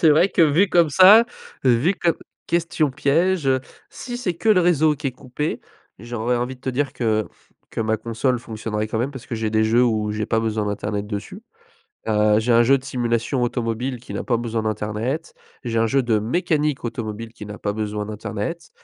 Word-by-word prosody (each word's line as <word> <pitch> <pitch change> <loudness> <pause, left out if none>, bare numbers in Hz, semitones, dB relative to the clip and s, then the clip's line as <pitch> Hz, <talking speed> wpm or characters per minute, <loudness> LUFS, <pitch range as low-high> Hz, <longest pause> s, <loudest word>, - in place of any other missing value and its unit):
C'est 160 - +6
vrai 160 +6 +5
que 170 - +3
vu 160 +6 +4
comme 170 -4 +3
ça 195 +9 +8 0.4
vu 130 +9 +3
comme 170 -3 +1 0.3
question 165 -3 0
piège, 155 +5 +1
heu! 130 -1 +3 0.3
Si 245 -2 -6
c'est 190 -8 -2
que 220 - -3
le 205 -4 +6
réseau 160 -3 +3
qui 145 0 -4
est - - -7
coupé, 130 +4 -4 0.4
j'aurais 120 +2 -2
envie 125 +2 -3
de - - -30
te 130 - -2
dire 140 +2 -1
que 110 -3 0 0.4
que - - -4
ma 110 0 +1
console 115 +3 -1
fonctionnerait 110 -2 -4
quand 110 - -3
même 125 +4 -1
parce 135 -4 -10
que 120 - -4
j'ai 110 -1 -2
des 110 0 +2
jeux 115 +3 +4
où 110 -3 0
j'ai 105 0 -2
pas 115 - +1
besoin 110 -2 -1
d'internet 105 0 -3
dessus. 115 - -6 0.7
Heu, 105 0 +3
j'ai 115 +2 +1
un 115 0 +6
jeu 135 +4 +4
de 130 - -16
simulation 125 -1 -1
automobile 120 +1 -2
qui 125 - -9
n'a - - -3
pas 120 - +1
besoin 115 -1 -2
d'internet. 110 - -3 0.3
J'ai 115 -2 -1
un 115 - +3
jeu 135 +3 +2
de 115 -3 +2
mécanique 150 - 0
automobile 115 -1 -5
qui 110 -3 -10
n'a 105 0 -8
pas 105 - -2
besoin 105 -1 -3
d'internet. 110 - -5
120 Hz, 205 wpm, -22 LUFS, 110-145 Hz, 0.7 s, ça